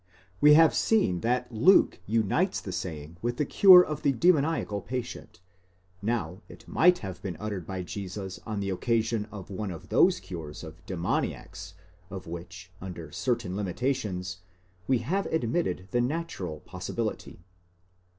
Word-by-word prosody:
We 150 0 +8
have 160 0 +6
seen 150 - +2
that 125 +3 -1
Luke 145 - +5
unites 115 - +1
the 95 - -7
saying 85 -3 -6
with 120 +1 -2
the 150 - +1
cure 185 +3 +8
of 150 - -5
a 140 - +4
demoniacal 145 - +2
patient: 125 -7 -6 0.6
now 100 -4 -2
it - - -14
might 180 +2 +4
have 95 -2 -7
been 90 -4 -5
uttered 100 -4 -5
by 95 -1 -4
Jesus 95 0 -6
on 105 -2 -4
the 100 0 -2
occasion 115 +2 0
of 100 -2 -9
one 100 +1 -4
of 85 -3 -9
those - - +4
cures 80 -4 -8
of 80 +2 -11
demon 90 -4 0
iacs 90 0 -9 0.4
of 95 -2 -7
which, 85 +2 -9
under 85 -4 -7
certain 115 - -1
limitations, 95 -3 -2 0.5
we 130 - +3
have 195 +8 0
admitted 120 - -1
the 120 - +2
natural 120 - -3
pos 90 +2 -8
sibility. 115 -3 -3
100 Hz, 150 wpm, -28 LUFS, 90-125 Hz, 0.6 s, We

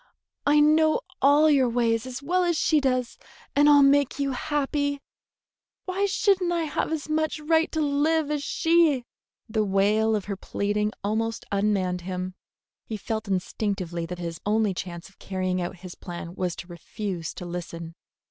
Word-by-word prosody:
I 295 +1 +5
know 310 +6 +4 0.2
all 290 +3 +6
your 275 -5 +4
ways 230 0 +1
as 255 +2 -7
well 360 +5 +1
as 345 -2 +1
she 305 -1 +3
does, 255 -3 -1 0.4
and 290 +1 +6
I'll 290 -1 +7
make 280 -1 +3
you 280 -1 0
happy. 285 +1 -1 0.9
Why 390 +2 0
should 390 0 +2
n't 350 -1 0
I 340 -1 0
have 310 0 -2
as 315 -3 -3
much 310 0 0
right 320 +2 +2
to 315 - -2
live 300 +1 +1
as 295 -1 -1
she?" 320 -4 +2 0.4
The 220 -1 0
wail 210 +3 +2
of 205 - -2
her 200 - -3
pleading 205 +2 -1
almost 225 +2 -1
unmanned 195 -3 0
him. 185 +1 -4 0.5
He 220 - -5
felt 220 +1 -4
instinctively 185 -3 -2
that 180 +1 -6
his 170 -1 -6
only 210 -1 +1
chance 175 -2 -6
of 195 - -23
carrying 185 -1 -2
through 175 0 -3
his 180 0 -10
plan 175 -1 -8
was 180 -2 -2
to - - -9
refuse 175 -1 -5
to 180 - -7
listen. 170 -1 -6
225 Hz, 170 wpm, -26 LUFS, 190-295 Hz, 0.9 s, I'll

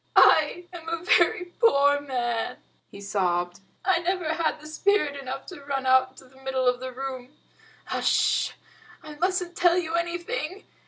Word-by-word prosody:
"I 320 +3 +5
am 330 -2 -7
a 335 0 -3
very 355 0 +3
poor 285 - +4
man," 240 -4 -2 0.3
he 200 - -12
sobbed. 180 -3 -1 0.3
"I 370 -2 +3
never 345 -2 -1
had 320 -1 0
spirit 310 -2 +1
enough 270 -1 -6
to 355 -7 -10
run 275 -1 -3
out 260 0 +4
into 260 0 -17
the 265 +1 -20
middle 265 -1 -1
of 250 0 +2
the 260 0 -6
room. 260 +1 -7 0.6
H'sh! - - +2 0.5
I 305 -1 -9
mustn't 360 +2 -1
tell 350 0 +4
you 330 -2 -2
anything. 340 0 -3
285 Hz, 155 wpm, -26 LUFS, 260-345 Hz, 0.6 s, I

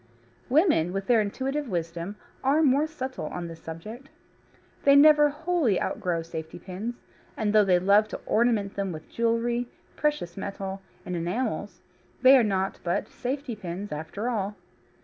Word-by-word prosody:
Women, 270 - +3
with 195 0 -2
their 235 -1 +4
intuitive 265 +6 -2
wisdom, 170 +2 -3 0.3
are 285 +4 +3
more 285 +2 +3
subtle 260 - -5
in 175 -1 -4
this 165 -1 -10
subject. 215 +12 -8 0.7
They 280 0 +6
never 295 0 +7
wholly 300 - +1
outgrow 170 -3 -2
safety 160 -1 -7
pins, 190 +7 -5 0.4
and 215 -2 0
though 215 -1 +6
they 185 -2 +4
love 200 +4 +4
to - - -6
ornament 220 -3 +2
them 195 -2 -2
with 155 -1 -9
jewellery, 235 +1 0 0.3
precious 295 - -1
metal, 195 -1 -5 0.2
and 180 - -3
enamels, 185 +1 -3 0.4
they 260 +1 +9
are 260 - +6
naught 195 -3 0
but 175 0 -1
safety 260 -1 -4
pins 195 0 -6
after 160 +9 -4
all. 205 -4 -1
210 Hz, 150 wpm, -27 LUFS, 180-260 Hz, 0.7 s, they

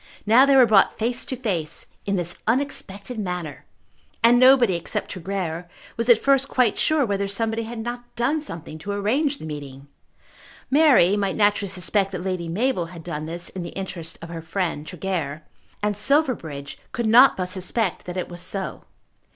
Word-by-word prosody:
Now 240 +6 +6
they 275 - +5
were 260 -2 +8
brought 210 -4 +4
face 240 +2 -1
to 260 - -3
face 180 -11 -3 0.2
in 200 - +1
this 175 -1 -2
unexpected 230 -3 -2
manner! 180 -7 -5 0.6
And 240 +1 +6
nobody 255 -5 +6
except 170 - -4
Tregear 180 -2 -4 0.3
was 230 +1 -2
at 240 - +8
first 275 -1 +2
quite 250 -6 +2
sure 310 -3 +2
whether 200 -2 -1
somebody 225 +3 -1
had 235 +1 -7
not 240 +2 -6
done 260 +6 0
something 165 - -8
to 200 +6 -4
arrange 270 +9 0
the - - -9
meeting. 140 -2 -8 0.8
Mary 265 - +5
might 200 -2 -1
naturally 205 -1 +2
suspect 190 +2 0
that 180 -1 -4
Lady 185 -3 -3
Mabel 190 -1 0
had 170 -1 -11
done 155 -2 -5
this 170 +1 -5
in 185 - -7
the 170 - -7
interest 175 -4 -6
of 165 - -8
her 165 -1 -6
friend 165 -2 -3
Tregear, 165 -5 -4 0.4
and 210 0 +1
Silverbridge 210 - 0
could 235 - -2
not 240 +5 +7
but 185 - -1
suspect 185 +2 -1
that 180 +1 -6
it 180 - -2
was 175 -1 -7
so. 190 +2 -4
200 Hz, 175 wpm, -23 LUFS, 175-240 Hz, 0.8 s, were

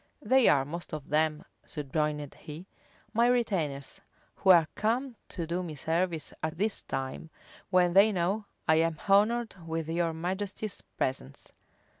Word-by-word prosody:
"They 260 -2 +5
are 135 -2 +4
most 170 +2 -6
of 150 -3 -9
them," 155 0 +1 0.2
subjoined 150 0 -2
he, 155 +4 -10 0.5
"my 235 +2 +4
retainers, 180 - 0 0.4
who 190 - +1
are 170 -4 +8
come 235 +4 -1
to 170 - -4
do 170 +3 -2
me 165 -4 -6
service 165 +1 -1
at 160 +1 -3
this 210 +3 0
time, 135 +4 -5 0.4
when 180 -2 +4
they 200 +3 +7
know 195 +3 0 0.2
I 160 - +5
am 165 -1 +2
honored 220 +4 +3
with 160 -1 -2
your 165 0 +1
majesty's 190 +5 -3 0.2
presence." 130 - -3
170 Hz, 145 wpm, -29 LUFS, 155-200 Hz, 0.5 s, are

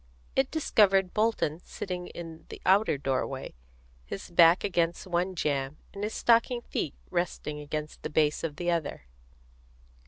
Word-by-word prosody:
It 265 0 +2
discovered 195 - +3
Bolton 210 -7 +1
sitting 180 -2 -5
in 165 -2 -9
the - - -8
outer 195 -4 +4
doorway, 135 0 -2 0.5
his 100 - -7
back 170 +1 +6
against 170 -4 0
one 180 +1 -1
jamb 140 -2 -1 0.2
and 200 - -6
his 215 +1 -2
stocking 240 +1 +3
feet 155 - -3 0.2
resting 175 -4 -2
against 150 +1 -5
the - - -4
base 150 -1 +2
of 155 -3 -3
the 175 +2 -1
other. 165 - -2
170 Hz, 145 wpm, -29 LUFS, 150-195 Hz, 0.5 s, back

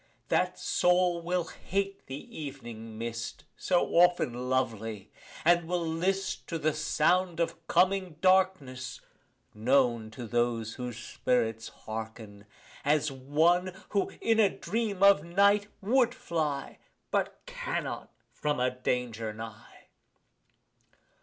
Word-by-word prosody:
That - - +1
soul 180 -1 +2
will 175 +1 0
hate 195 +3 -3
the 145 +2 -6
ev'ning 115 -5 -9
mist, 115 0 -5
So 180 -2 +2
often 130 -8 +3
lovely, 115 -6 -1 0.3
and 170 0 +4
will 175 -1 0
list 185 +4 -1
To 165 - -2
the 155 0 +1
sound 170 +3 +1
of 170 - +2
the - - -21
coming 185 -1 +2
darkness 185 -9 +2 0.5
(known 115 -1 +2
To 120 +2 -8
those 115 -1 0
whose 125 -3 -5
spirits 115 -1 -1
hearken) 110 -2 -8 0.4
as 150 0 +2
one 160 +7 +2 0.2
Who, 200 -2 +1
in 225 -1 +3
a 205 -3 +6
dream 210 -2 -2
of 200 -6 +7
night, 200 +4 +3
would 240 +3 +3
fly 150 -4 -3 0.3
But - - 0
cannot, - - -4 0.2
from 150 -3 -1
a 125 0 +2
danger 125 -3 -2
nigh. 110 0 -10
150 Hz, 120 wpm, -29 LUFS, 120-180 Hz, 0.5 s, of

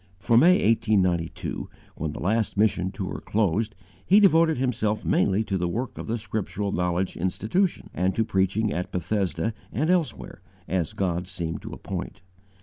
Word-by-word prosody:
From 115 +5 +4
May, 180 +7 +5
1892, 100 -7 +1 0.3
when 80 -2 -3
the - - -7
last 110 +3 0
mission 100 -3 +2
tour 95 -1 -5
closed; 105 +1 0 0.3
he 200 +3 +6
devoted 165 -6 +5
himself 115 -4 -1
mainly 100 +2 +2
to 95 -3 -2
the 90 - 0
work 115 +8 -3
of - - -6
the 115 +1 -1
Scriptural 105 -2 -3
Knowledge 90 +1 -1
Institution, 110 - -1
and 90 +2 0
to 115 - +2
preaching 100 +1 +1
at 90 +1 -3
Bethesda 90 +1 -1 0.2
and 155 - +1
elsewhere 175 -4 -1 0.3
as 90 -2 -1
God 90 -2 -1
seemed 85 -3 -4
to - - -8
appoint. - - -6
100 Hz, 155 wpm, -25 LUFS, 90-115 Hz, 0.3 s, he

